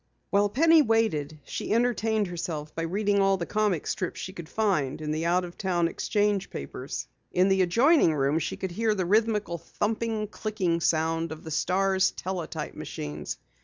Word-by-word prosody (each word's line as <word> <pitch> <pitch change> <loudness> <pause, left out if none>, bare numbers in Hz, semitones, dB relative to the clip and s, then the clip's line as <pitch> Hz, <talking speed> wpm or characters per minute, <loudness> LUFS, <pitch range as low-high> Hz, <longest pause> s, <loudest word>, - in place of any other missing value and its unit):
While 205 +1 +3
Penny 320 +7 +5
waited, 220 - +1
she - - -4
entertained 225 -2 +2
herself 165 -4 -5
by 165 - -3
reading 200 +4 +1
all 195 0 +3
the 170 - -3
comic 210 -6 0
strips 185 0 -3
she 185 +2 -6
could 170 -4 -9
find 180 -12 0
in 150 -1 -3
the 160 +2 -1
out 180 +1 +2
of 175 - -11
town 175 -3 +1
exchange 205 +2 0
papers. 70 - -6 0.3
In 185 +2 +3
the 190 0 +3
adjoining 230 - +4
room 140 +2 +2
she 160 - -3
could 190 - -4
hear 220 +3 +1
the 185 -3 -1
rhythmical 210 -3 +1
thumping, 215 +5 -2
clicking 200 -5 -2
sound 165 0 +1
of 160 0 -8
the 160 - -7
Star's 190 +3 +2
teletype 185 -3 -5
machines. 75 0 -6
185 Hz, 170 wpm, -27 LUFS, 165-215 Hz, 0.3 s, Penny